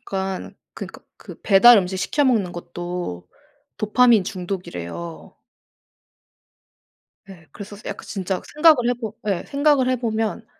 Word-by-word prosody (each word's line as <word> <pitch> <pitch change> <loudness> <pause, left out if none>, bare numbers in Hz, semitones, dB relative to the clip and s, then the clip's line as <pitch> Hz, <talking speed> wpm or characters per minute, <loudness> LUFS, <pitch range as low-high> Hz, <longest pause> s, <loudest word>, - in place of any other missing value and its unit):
약간 190 -1 -5 0.2
그니까 - - -9 0.2
그 - - -13
배달 220 +3 +7
음식 190 0 -2
시켜 290 +9 0
먹는 215 -9 +1
것도 175 - -6 0.5
도파민 220 -1 +4
중독이래요. 170 - -7 1.9
예. 170 -4 -14
그래서 205 0 -10
스 205 - -16
약간 - - -6
진짜 190 -2 -3
생각을 300 -6 +5
해 245 - +2
보 220 -3 -6
예. 195 -4 -1
생각을 280 -2 +2
해 255 - +2
보면 225 -2 -2
200 Hz, 255 characters per minute, -22 LUFS, 180-240 Hz, 1.9 s, 배달